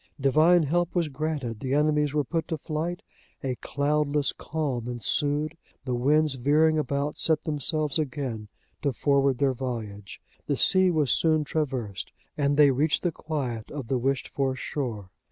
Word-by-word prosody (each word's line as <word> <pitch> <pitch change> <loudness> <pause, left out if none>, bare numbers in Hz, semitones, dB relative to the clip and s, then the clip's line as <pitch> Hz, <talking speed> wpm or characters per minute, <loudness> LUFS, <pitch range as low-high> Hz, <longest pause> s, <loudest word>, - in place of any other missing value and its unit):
Divine 155 +6 +4
help 175 +4 0
was 170 -3 +1
granted, 140 -6 -3
the 135 0 -1
enemies 150 -1 +2
were 150 0 +1
put 165 +4 -2
to 160 - -2
flight, 165 +5 -4 0.4
a 130 -2 -1
cloudless 145 +1 0
calm 140 -7 -3
ensued, 145 +5 0 0.3
the 130 - -2
winds 145 +4 +3
veering 150 +5 +3
about 140 +1 -2
set 160 -2 +2
themselves 155 0 +1
again 130 -7 -3 0.3
to 140 -2 0
forward 140 0 +2
their 140 -1 +2
voyage, 110 -6 -6 0.3
the 140 -1 0
sea 185 -1 +5
was 155 -6 +1
soon 155 -2 +3
traversed, 130 -10 -3 0.2
and 145 0 +1
they 145 -2 +7
reached 145 +4 +1
the 175 - +1
quiet 130 -9 -4
of 135 -6 -7
the 130 - +1
wished 135 +2 -1
for 135 -2 -1
shore. 115 -9 -4
145 Hz, 155 wpm, -26 LUFS, 130-155 Hz, 0.4 s, they